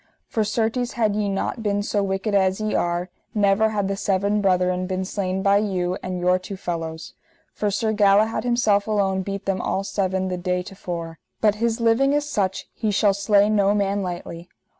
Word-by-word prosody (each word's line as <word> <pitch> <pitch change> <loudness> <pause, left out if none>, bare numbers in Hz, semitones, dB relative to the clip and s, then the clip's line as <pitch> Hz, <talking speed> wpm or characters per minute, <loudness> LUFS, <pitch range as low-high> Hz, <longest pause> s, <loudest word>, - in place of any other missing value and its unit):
For 220 - -1
certes 225 +3 -1
had 215 -3 +1
ye 210 -1 0
not 195 +4 -2
been 205 -1 0
so 205 0 0
wicked 195 +2 -2
as 190 -1 +2
ye 215 0 -2
are, 175 +1 -1 0.2
never 205 +1 +3
had 205 -2 -1
the 195 - -1
seven 200 +1 0
brethren 185 -1 +1
been 185 0 -2
slain 190 -1 -2
by 200 0 +4
you 185 -3 -1
and 185 -1 -4
your 180 +1 +2
two 190 +2 -7
fellows. 165 -3 -5 0.4
For 210 - -1
Sir 220 +2 0
Galahad 210 +1 +3
himself 220 -4 +2
alone 195 -3 +1
beat 195 +1 -5
them 195 -1 -1
all 195 - -1
seven 190 -2 -1
the 180 -1 -2
day 180 0 -1
to 190 - -10
fore, 170 -4 -6 0.2
but 210 -2 +3
his 230 0 +1
living 235 +5 +3
is 295 0 0
such 195 -9 -1
he 220 - -2
shall 205 0 +3
slay 200 +1 +3
no 205 -1 +3
man 200 0 0
lightly. 175 -1 -6
200 Hz, 195 wpm, -23 LUFS, 185-210 Hz, 0.4 s, by